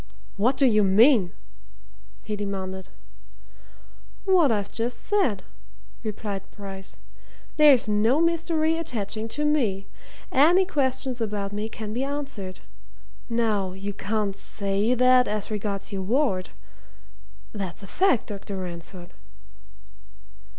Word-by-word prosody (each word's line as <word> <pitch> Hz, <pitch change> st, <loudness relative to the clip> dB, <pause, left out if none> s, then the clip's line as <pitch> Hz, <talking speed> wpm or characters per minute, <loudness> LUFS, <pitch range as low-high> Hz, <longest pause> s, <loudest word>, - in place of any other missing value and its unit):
"What 245 Hz, +6 st, +2 dB
do 275 Hz, -, +4 dB
you 215 Hz, -4 st, +4 dB
mean?" 205 Hz, 0 st, +5 dB, 0.9 s
he 210 Hz, -, -3 dB
demanded. 190 Hz, -2 st, -5 dB, 1.4 s
"What 360 Hz, -8 st, +4 dB
I've 205 Hz, -2 st, -1 dB
just 235 Hz, +1 st, -3 dB
said," 360 Hz, -, +1 dB, 0.6 s
replied 210 Hz, -2 st, -4 dB
Bryce. 195 Hz, -2 st, -8 dB, 0.6 s
"There's 290 Hz, -7 st, +6 dB
no 215 Hz, +7 st, +3 dB
mystery 330 Hz, -1 st, +1 dB
attaching 225 Hz, -7 st, -3 dB
to 295 Hz, +6 st, -2 dB
me. 225 Hz, -11 st, +1 dB, 0.5 s
Any 340 Hz, +8 st, +5 dB
question 265 Hz, -6 st, 0 dB
about 205 Hz, -3 st, -3 dB
me 210 Hz, +2 st, -3 dB
can 215 Hz, -1 st, -6 dB
be 250 Hz, +3 st, -1 dB
answered. 275 Hz, -10 st, -5 dB, 0.7 s
Now, 215 Hz, -5 st, 0 dB
you 200 Hz, +2 st, -5 dB
can't 205 Hz, 0 st, -2 dB
say 200 Hz, +5 st, 0 dB
that 255 Hz, 0 st, +5 dB
as 210 Hz, +1 st, -3 dB
regards 205 Hz, -1 st, -3 dB
your 195 Hz, -, -2 dB
ward. 195 Hz, -3 st, 0 dB, 1.0 s
That's 195 Hz, -2 st, -5 dB
a -, -, -9 dB
fact, 365 Hz, -, +2 dB
Dr. 200 Hz, -1 st, -6 dB
Ransford." 175 Hz, 0 st, -7 dB
215 Hz, 115 wpm, -25 LUFS, 195-265 Hz, 1.4 s, There's